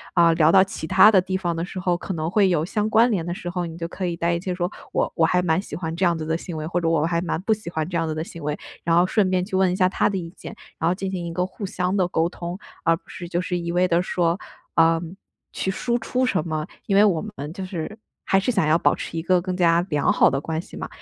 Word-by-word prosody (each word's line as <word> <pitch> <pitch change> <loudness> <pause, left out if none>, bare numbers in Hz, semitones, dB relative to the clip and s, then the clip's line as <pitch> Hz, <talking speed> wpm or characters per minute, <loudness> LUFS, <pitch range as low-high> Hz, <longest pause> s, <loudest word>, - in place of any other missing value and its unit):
啊 170 -2 +5
聊 160 -1 +4
到 190 0 +7
其 190 -4 -6
他 190 +4 +7
的 190 -4 +5
地 185 +1 -2
方 175 -3 -2
的 165 - -2
时 185 +1 -6
候， 180 -1 +1
可 185 +2 -5
能 155 -1 -2
会 200 -1 +4
有 165 -3 +1
相 210 +3 -1
关 230 +3 +4
联 190 -6 0
的 175 - -4
时 175 - -8
候， 175 0 -2
你 165 0 -8
就 165 -1 -4
可 185 +1 -4
以 170 - -2
带 170 +1 0
一 170 - -1
些 185 -1 -3
说， 180 +1 -2 0.2
“我 - - 0
我 165 - +2
还 180 +2 +3
蛮 165 0 +2
喜 - - -8
欢 165 -2 -4
这 185 - -2
样 170 -2 +3
子 155 - -4
的 160 +1 0
行 170 0 -6
为”， 155 - -4
或 175 +2 -1
者， 165 - +1
“我 160 -2 +2
还 170 0 0
蛮 170 - -2
不 220 - +3
喜 210 -5 -6
欢 160 -2 -2
这 180 - -5
样 165 -1 0
子 155 - -3
的 155 - -2
行 170 0 -10
为”， 150 0 -2 0.3
然 165 0 +2
后 175 - +5
顺 195 0 +2
便 185 -1 +1
去 190 - -4
问 185 -1 +3
一 - - -1
下 185 -1 +3
他 185 - +1
的 200 - -2
意 170 -1 -6
见， - - -9 0.2
然 165 - +2
后 180 - +1
进 190 0 -4
行 180 -2 -3
一 - - -4
个 180 +2 0
互 185 +3 -10
相 185 0 -1
的 185 -3 +2
沟 165 -2 +1
通。 175 0 -6 0.3
而 165 0 +3
不 - - -30
是 175 -2 -8
就 175 - 0
是 180 0 -2
一 170 0 -3
味 180 +1 +2
地 170 0 +2
说， 175 0 0 0.3
呃， 165 0 +4 0.5
去 - - -3
输 240 +5 -1
出 255 +3 0
什 185 -10 0
么。 155 -1 -2 0.2
因 195 - +1
为 200 - +7
我 175 -6 +2
们 155 -9 -7
就 190 - -6
是， 185 +2 -5 0.3
还 195 - +4
是 225 +6 0
想 195 -9 +1
要 155 +1 +4
保 - - +3
持 165 - -6
一 - - -1
个 180 +1 +2
更 185 0 -3
加 170 -2 +4
良 150 -2 +2
好 - - +5
的 135 - -1
关 160 +1 -3
系 - - -14
嘛， - - -5
175 Hz, 330 characters per minute, -23 LUFS, 165-190 Hz, 0.5 s, 到